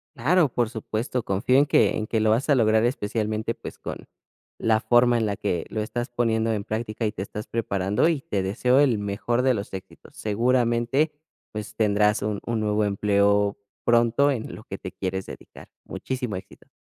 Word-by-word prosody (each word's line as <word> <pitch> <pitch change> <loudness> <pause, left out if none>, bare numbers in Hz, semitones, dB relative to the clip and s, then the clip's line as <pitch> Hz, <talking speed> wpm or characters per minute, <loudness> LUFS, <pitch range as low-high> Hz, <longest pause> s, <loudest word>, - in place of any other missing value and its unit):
Claro, 155 +4 +3
por 120 -2 0
supuesto. 115 +2 -3
Confío 105 +7 +2
en 140 - +5
que 150 - +3
en 110 - -2
que 110 +1 -1
lo 110 0 +2
vas 115 +5 +2
a - - +6
lograr 110 -2 +3
especialmente, 110 -2 -1
pues - - -9
con - - -7 0.5
la 110 -1 +2
forma 120 +1 +4
en 115 - +1
la 100 -1 -1
que 90 -5 -2
lo 110 - -2
estás 120 +3 -3
poniendo 115 -2 +1
en 105 -2 -2
práctica, 110 +1 -3
y 105 - -1
te 95 - -5
estás 105 +1 -7
preparando, 100 - 0
y 160 -5 0
te 100 -7 -2
deseo 125 +7 +2
el 130 -7 +3
mejor 105 +4 -1
de 130 -1 +3
los 100 -2 -6
éxitos. 95 -1 -10
Seguramente, 120 +5 +1 0.4
pues 105 -1 -7
tendrás 105 -1 +2
un 105 -1 -2
un 115 -1 -1
nuevo 105 0 +1
empleo 100 0 +2 0.3
pronto 120 +4 +4
en 120 -5 -4
lo - - -11
que - - -6
te - - -7
quieres 95 0 -4
dedicar. - - -12 0.2
Muchísimo 125 -5 -4
éxito. 95 +1 -10
110 Hz, 190 wpm, -25 LUFS, 105-120 Hz, 0.5 s, a